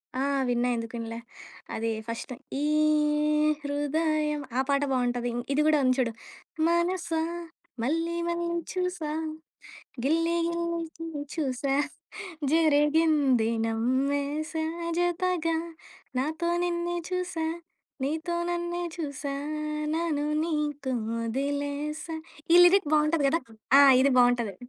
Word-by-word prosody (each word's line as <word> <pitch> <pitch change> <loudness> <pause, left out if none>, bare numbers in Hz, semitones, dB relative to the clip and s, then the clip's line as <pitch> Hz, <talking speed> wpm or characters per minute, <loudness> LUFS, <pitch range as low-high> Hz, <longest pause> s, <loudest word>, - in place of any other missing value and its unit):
ఆ! 260 - -1 0.3
విన్నా 245 0 +1
ఎందుకిన్లే. 230 0 -5 0.6
అదే 225 +1 -1 0.2
ఫస్టు 230 +3 -5 0.3
ఈ - - +1 1.0
హృదయం 300 +1 0 0.2
ఆ 265 - +4
పాట 280 0 +3
బావుంటది. 245 -1 0
ఇన్ 240 - -2
ఇది 295 - +3
గూడా 310 -1 +4
ఉంది 255 0 +3
చూడు. 235 -2 +1 0.6
మనసా 340 -1 +1 0.6
మల్లి 330 +7 0
మల్లి 340 0 -1 0.2
చూసా 360 -4 -2 1.0
గిల్లి 330 +4 +2
గిల్లి 335 -2 -3
చూసా 275 -3 -1 0.8
జరిగింది 295 -6 +3
నమ్మేశా, 280 +7 0 0.3
జతగా 350 -2 +1 0.6
నాతో 315 +5 -1
నిన్నె 345 0 -1
చూసా, 365 -3 -2 0.6
నీతోనన్నే 345 +3 -2
చుసా 285 -3 -4 0.6
నను 320 -3 0 0.2
నీకు 295 -4 -2 0.3
ఒదిలేస 285 +5 -2 0.5
ఈ - - +9
లిరిక్ 355 -3 +4
బావుంటది 305 -1 +3
గదా! 330 +4 +1 0.4
ఆ! - - +9 0.2
ఇది 275 0 +4
బావుంటది. 245 -4 +3
300 Hz, 95 wpm, -27 LUFS, 270-335 Hz, 1.0 s, ఈ